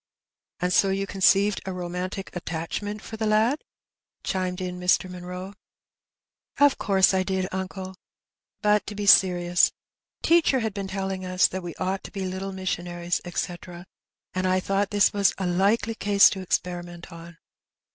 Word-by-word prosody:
''And 180 0 0
so 195 - +4
you 195 +1 -1
conceived 195 +1 +3
a 190 - -3
romantic 180 +2 -5
attachment 175 +5 -4
for 220 - -8
the 220 0 -1
lad?" 220 +7 +2 0.6
chimed 185 -1 -2
in 180 -1 -4
Mr. 180 +1 +2
Munroe. 180 +1 -7 0.5
'* - - -27
Of 280 - -3
course 190 -2 +3
I 190 - +2
did, 190 0 -1
uncle; 190 0 -5 0.7
but 210 0 +3
to 210 - -6
be 205 0 -3
serious. 180 -3 +5 0.5
Teacher 325 -6 +4
had 220 -2 -2
been 200 -1 -4
telling 190 -1 -4
us 185 0 +2
that 190 - -5
we 175 -2 -7
ought 190 +1 -2
to - - -9
be 195 -2 -4
little 190 +1 -4
missionaries, 175 -2 -3
eta, 175 0 -5 0.5
and 185 0 -1
I 185 0 +2
thought 195 +1 0
this 205 -1 +3
was 200 -2 +2
a 190 - -3
likely 200 +6 +1
case 205 -2 +5
to 190 - -4
experiment 175 -1 -3
on. 170 0 -11
190 Hz, 160 wpm, -25 LUFS, 180-200 Hz, 0.7 s, serious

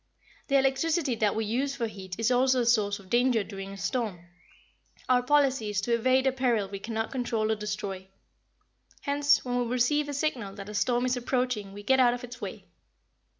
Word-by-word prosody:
"The 275 - +3
electricity 275 +2 +1
that 210 -2 +1
we 220 0 -1
use 265 +6 -1
for 240 -4 -2
heat 190 -4 -7
is 225 +2 +1
also 255 0 +3
a - - 0
source 210 -4 +2
of 195 - -15
danger 240 -2 +3
during 195 -1 -8
a - - -9
storm. 195 -2 -3 0.8
Our 250 -1 +4
policy 270 -4 +2
is 205 -1 0
to 235 +3 -1
evade 255 +3 +3
a 265 - +4
peril 245 -6 +1
we 195 0 -7
cannot 225 +1 -3
control 230 -4 -1
or - - +2
destroy. 205 -3 -5 0.9
Hence, 285 -1 +2
when 245 0 -1
we 245 - 0
receive 255 +5 +1
a - - -3
signal 250 -9 -2
that 200 0 -8
a - - -7
storm 240 +4 +1
is 250 0 0
approaching 245 -5 -1
we 205 +1 -10
get 265 +5 +3
out 245 -1 +5
of 245 - -9
its 245 0 -9
way. - - -7
240 Hz, 200 wpm, -28 LUFS, 210-260 Hz, 0.9 s, out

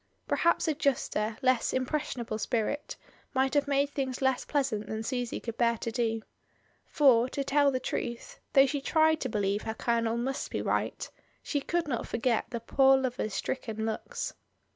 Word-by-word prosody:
Perhaps 340 0 +2
a 315 - +3
juster, 235 -7 0
less 255 -2 +2
impressionable 255 -4 -2
spirit 240 +7 -2 0.4
might 265 0 +2
have 290 -1 +2
made 280 0 +2
things 265 -3 -2
less 265 -1 +1
pleasant 265 -8 -1
than 220 0 -3
Susy 245 0 -2
could 230 -1 -6
bear 235 -1 +3
to 230 - -4
do. 225 -2 -1 0.6
For, 255 -5 +4
to 275 - -2
tell 285 +1 +3
the 260 -2 0
truth, 245 - -4
though 270 -1 +7
she 275 +1 -2
tried 315 +2 +3
to 260 - -1
believe 205 -1 0
her 220 - -4
colonel 230 0 0
must 265 +3 -2
be - - -3
right, - - -1 0.4
she 285 - -1
could 340 +2 -1
not 245 -5 -2
forget 230 0 0
the 235 - -3
poor 270 +3 +4
lover's 250 -6 -2
stricken 220 -1 -3
looks. 475 - -3
255 Hz, 170 wpm, -29 LUFS, 230-280 Hz, 0.6 s, though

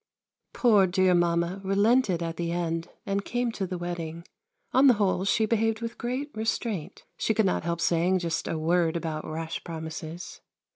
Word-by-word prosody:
Poor 210 -6 +5
dear 185 0 +3
Mamma 175 +2 +1
relented 200 -1 +3
at 165 0 -4
the 170 -1 -2
end 170 -1 -2 0.2
and 200 0 -1
came 245 +1 -1
to 195 -4 -3
the 180 0 -4
wedding. 170 -1 -5 0.5
On 265 +2 +6
the 250 - +7
whole 195 -2 +1
she 220 +2 +3
behaved 225 0 +1
with 230 0 -6
great 255 +5 -3
restraint. 220 -5 -3
She 220 - 0
could 220 -1 +3
not 185 - +1
help 170 0 -1
saying 175 +3 +2
just 170 -2 -2
a 165 - -2
word 165 +1 +2
about 160 -2 -4
rash 160 +1 -4
promises. 160 +1 -7
180 Hz, 175 wpm, -27 LUFS, 170-215 Hz, 0.5 s, the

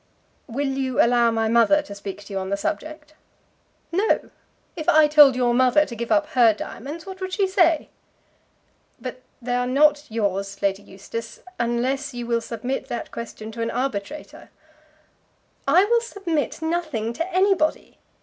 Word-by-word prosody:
"Will 275 +3 -2
you 265 -2 -2
allow 235 0 +4
my 225 -1 0
mother 235 +6 +4
to 200 - -9
speak 200 0 -8
to 200 - -10
you 195 - -1
on 190 0 -5
the 200 - 0
subject?" 310 +4 -5 0.8
"No. 390 +6 +1 0.4
If 315 -2 -2
I 310 0 +6
told 295 -3 +7
your 245 -1 +2
mother 255 +4 +4
to 235 - -8
give 235 +1 -5
up 305 0 +4
her 240 -7 +4
diamonds, 290 - -7
what 380 0 -9
would 375 0 -4
she 395 - +2
say?" 345 -4 +2 1.1
"But 255 0 -7 0.2
they 245 +1 -2
are 245 0 0
not 290 +3 +3
yours, 200 -3 -2
Lady 195 0 +1
Eustace, 220 +4 -8 0.2
unless 245 +3 -1
you 240 -1 -4
will 235 0 0
submit 240 +4 -4
that 240 - -5
question 220 -1 -7
to 230 +1 -6
an 230 - -1
arbitrator." 260 +2 -4 1.2
"I 375 - +5
will 470 +2 +3
submit 345 -9 -3
nothing 310 -10 -2
to 335 +9 -4
anybody. 370 -4 +1
255 Hz, 160 wpm, -23 LUFS, 230-310 Hz, 1.2 s, told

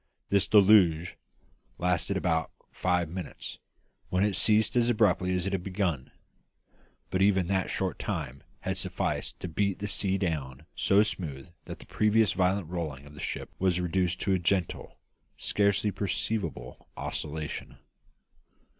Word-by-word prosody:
This 100 -1 +3
deluge 95 -5 +5 0.6
lasted 90 +2 0
for - - +1
about 80 -4 0 0.2
five 90 -2 0
minutes, 85 -2 -7 0.5
when 90 +1 +2
it 105 -2 +1
ceased 110 +4 +3
as 120 -1 +3
abruptly 100 -5 +2
as 90 -1 -1
it 100 - -2
had 95 - 0
begun; 90 -8 -2 1.0
but 95 - 0
even 95 -2 +4
that 95 -2 +1
short 95 -1 -2
time 75 -9 -4 0.2
had - - -2
sufficed - - -2
to - - -3
beat 100 +3 0
the 105 - -4
sea 95 -1 0
down 75 -6 -3
so 100 +2 +4
smooth 80 -8 -4 0.2
that - - -7
the - - -13
previous 110 0 +2
violent 95 -1 +1
rolling 80 -5 -4
of 70 - -13
the 75 - -12
ship - - -4
was 90 -1 +2
reduced 90 0 0
to 100 - +1
a 95 - +2
gentle, 90 0 -1 0.4
scarcely 100 0 +1
perceptible 95 - -3
oscillation. 75 0 -4
95 Hz, 145 wpm, -29 LUFS, 85-100 Hz, 1.0 s, deluge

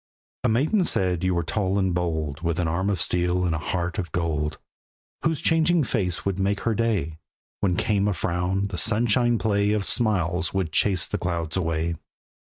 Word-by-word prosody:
A - - +2
maiden 150 - +2
said 90 - +1
you 95 -1 +1
were 85 - 0
tall 95 +2 -1
and 95 -2 +1
bold, 80 -4 -2
With 85 -1 -1
an 85 - 0
arm 90 +5 -1
of 100 -3 -1
steel 90 +1 +1
and 85 - 0
a 80 - -1
heart 85 +4 -3
of 85 -4 -4
gold; 75 -3 -2 0.6
Whose 155 -2 0
changing 165 0 +3
face 100 -8 -1
would 100 -1 -1
make 100 +1 0
her 115 - 0
day; 100 -9 -1 0.4
When 90 -3 +1
came 100 +1 +1
a 105 - +1
frown, 90 +3 -1
the 90 - -2
sunshine 120 +2 +3
play 105 -2 +1
Of 105 -2 0
smiles 95 -6 +1
would 95 -5 -1
chase 90 -1 +3
the - - -3
clouds 85 -3 -3
away. 85 -2 -1
95 Hz, 190 wpm, -24 LUFS, 85-105 Hz, 0.6 s, changing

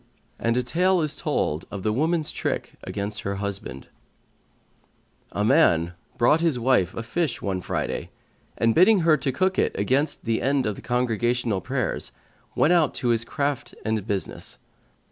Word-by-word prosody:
And 115 +1 +1
a 125 - +1
tale 180 +8 +2
is 150 -1 0
told 80 - -1
of 100 -2 -6
THE 110 - +1
WOMAN'S 155 +5 +1
TRICK - - -3
AGAINST 100 +1 -4
HER 100 0 -3
HUSBAND 100 -10 -5 1.4
A 105 - -1
man 90 - +4 0.2
brought 150 +7 +4
his 165 -6 +2
wife 120 -8 +2
a 115 - -4
fish 135 +2 -1
one 95 -2 -2
Friday - - -3 0.5
and, 115 0 +3
bidding 190 - +5
her 165 -1 +5
to 140 - -1
cook 185 +8 +1
it - - +1
against 135 +9 0
the 115 -1 0
end 135 0 +1
of 105 - -1
the - - -10
congregational 120 -3 0
prayers, 130 -3 -2 0.4
went 165 - +4
out 165 -5 +3
to 125 - -1
his 115 -1 +2
craft 140 +2 -3
and 110 -2 -1
business. 100 -3 -4
120 Hz, 165 wpm, -25 LUFS, 105-150 Hz, 1.4 s, bidding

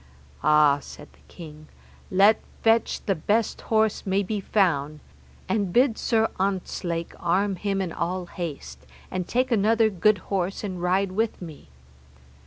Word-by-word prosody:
Ah, 150 -2 +5
said 150 - -12
the - - -24
king, 155 -3 -12 0.4
let 200 +3 +4 0.2
fetch 225 0 +2
the 195 - +2
best 205 +6 -1
horse 220 -1 +1
may 195 +1 0
be 210 +2 -3
found, 155 -8 0 0.5
and 200 -5 0
bid 245 +2 +3
Sir 225 -1 +1
Ontzlake 180 -3 -2
arm 190 +3 +1
him 195 +1 -2
in 175 - -4
all 180 +2 -3
haste, 170 -4 -7 0.3
and 185 -1 -3
take 255 +1 0
another 220 0 +3
good 205 +3 +3 0.2
horse 190 +1 -1
and 185 -4 -5
ride 185 +2 +1
with 220 +3 -1
me. 160 - -10
190 Hz, 145 wpm, -25 LUFS, 170-215 Hz, 0.5 s, Ah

